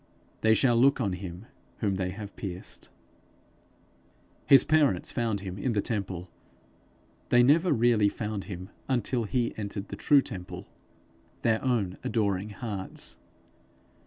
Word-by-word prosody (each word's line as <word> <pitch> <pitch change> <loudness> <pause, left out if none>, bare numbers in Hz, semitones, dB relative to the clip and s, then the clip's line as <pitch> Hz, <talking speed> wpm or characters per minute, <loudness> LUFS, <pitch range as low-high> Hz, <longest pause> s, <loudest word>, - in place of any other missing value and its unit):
They 110 0 +5
shall 120 -1 +4
look 135 +4 +5
on 100 -7 0
him 90 +2 -7 0.3
whom 100 -4 0
they 90 -1 -1
have 100 +2 -8
pierced.' 95 -2 -6 1.6
His 135 -2 +8
parents 155 -2 +2
found 115 -5 -1
him 95 0 -6
in 120 +4 0
the 105 - +1
temple; 95 -5 -4 1.0
they 120 0 +6
never 160 +7 +4
really 115 -5 +4
found 105 -2 -4
him 95 0 -7 0.2
until 125 -2 0
he 120 +2 0
entered 100 -1 -5
the - - -5
true 140 -2 +4
temple 90 -6 -7 0.8
their 110 -1 +2
own 110 -8 0
adoring 105 -2 0
hearts. 100 -2 -4
105 Hz, 130 wpm, -28 LUFS, 95-120 Hz, 1.6 s, His